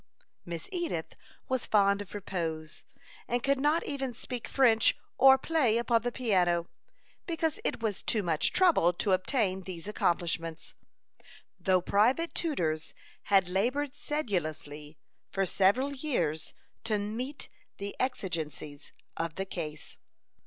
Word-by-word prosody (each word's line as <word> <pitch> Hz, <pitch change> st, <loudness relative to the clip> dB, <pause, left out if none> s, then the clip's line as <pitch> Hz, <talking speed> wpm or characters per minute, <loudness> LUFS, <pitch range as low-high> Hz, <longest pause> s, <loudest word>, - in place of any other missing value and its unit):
Miss 170 Hz, -2 st, -6 dB
Edith 345 Hz, -3 st, -3 dB, 0.3 s
was 260 Hz, -2 st, -1 dB
fond 200 Hz, -1 st, +3 dB
of 205 Hz, 0 st, -9 dB
repose, 165 Hz, -6 st, -4 dB, 0.4 s
and 245 Hz, 0 st, -1 dB
could 275 Hz, -1 st, +2 dB
not 300 Hz, +4 st, +2 dB
even 270 Hz, -3 st, -3 dB
speak 245 Hz, 0 st, -5 dB
French 230 Hz, -5 st, +4 dB, 0.2 s
or 265 Hz, 0 st, +7 dB
play 265 Hz, -6 st, +2 dB
upon 235 Hz, -1 st, +2 dB
the 245 Hz, +1 st, -2 dB
piano, 180 Hz, -9 st, +1 dB, 0.6 s
because 325 Hz, -2 st, -1 dB
it -, -, -1 dB
was 210 Hz, -3 st, -1 dB
too 215 Hz, -3 st, +1 dB
much 160 Hz, -3 st, +1 dB
trouble 335 Hz, -, +4 dB
to 195 Hz, +3 st, -1 dB
obtain 190 Hz, 0 st, +1 dB
these 180 Hz, -1 st, -7 dB
accomplishments, 170 Hz, -4 st, -1 dB, 0.9 s
though 185 Hz, -2 st, +3 dB
private 245 Hz, -, +2 dB
tutors 160 Hz, -, -1 dB, 0.3 s
had 195 Hz, -3 st, +4 dB
labored 255 Hz, +10 st, 0 dB
sedulously 155 Hz, -, -3 dB, 0.3 s
for 195 Hz, 0 st, 0 dB
several 205 Hz, +10 st, +2 dB
years 175 Hz, -, -2 dB, 0.3 s
to 220 Hz, -2 st, 0 dB
meet 230 Hz, +8 st, -4 dB, 0.3 s
the 200 Hz, 0 st, -5 dB
exigencies 160 Hz, -, -3 dB, 0.2 s
of 165 Hz, -1 st, -2 dB
the 195 Hz, -, -3 dB
case. 155 Hz, -5 st, -6 dB
205 Hz, 125 wpm, -30 LUFS, 170-260 Hz, 0.9 s, or